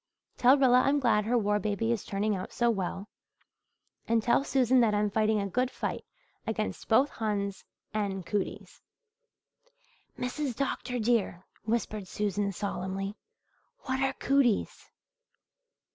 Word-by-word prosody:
"Tell 255 +3 +5
Rilla 255 -2 +5
I'm 280 +2 +2
glad 225 -5 +2
her 240 +2 +2
war 210 -2 +1
baby 215 +2 -1
is 230 -4 -1
turning 205 +1 -1
out 185 - -6
so 240 -1 +2
well, 195 -1 -3 1.0
and 225 -1 +2
tell 240 +3 +3
Susan 260 -2 +3
that 220 -3 +3
I'm 205 0 +1
fighting 215 0 +2
a 200 - -1
good 250 +6 0
fight - - -4 0.4
against 215 -1 -3
both 255 +6 +4
Huns 200 -3 -2 0.3
and 195 -4 -2
cooties." 200 -1 -4 1.4
"Mrs. 250 +1 -3
Dr. 255 -2 -2
dear," 220 -6 0 0.2
whispered 215 -3 -2
Susan 205 0 -1
solemnly, 195 0 -4 0.7
"what 260 0 -2
are 270 0 +1
cooties?" 265 -6 +1
215 Hz, 130 wpm, -29 LUFS, 200-250 Hz, 1.4 s, Tell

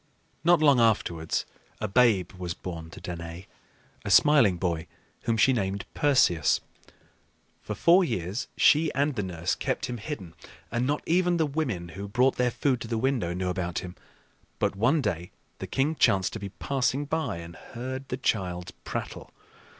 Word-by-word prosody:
Not 175 -1 +5
long 140 -4 +6
afterwards 90 -8 +1 0.3
a 110 - -2
babe 105 -5 +3
was 90 -2 -5
born 80 -3 -7
to - - -11
Danaë, 85 +1 -7 0.6
a - - -4
smiling 130 -12 +5
boy 85 -3 -2 0.4
whom 115 -1 +1
she 130 +4 +5
named 100 -3 -2
Perseus. 90 - +3 1.0
For 105 - -5
four 175 - +5
years 110 - -3
she 155 +2 +5
and 140 +2 +1
the 105 - -1
nurse 90 -2 -2
kept - - -2
him 120 - -4
hidden, 100 - -6 0.4
and 120 +3 0
not 145 +1 -1
even 175 +1 +2
the 160 - +2
women 130 - -2
who 100 +5 -7
brought 125 +6 +2
their 125 0 +2
food 130 0 0
to - - -5
the 115 0 -1
window 115 -8 0
knew 90 0 -2
about 90 -1 -3
him. 90 - -9 0.6
But - - 0
one 125 +10 +2
day 85 -3 -2 0.3
the - - -5
king 140 +4 +1
chanced 100 - +2
to 110 - -5
be 100 -1 -6
passing 135 +5 -1
by 150 - -2
and 85 0 -9
heard 130 +6 -7
the 125 - -2
child's 90 -8 -1
prattle. - - -5
110 Hz, 170 wpm, -27 LUFS, 90-135 Hz, 1.0 s, long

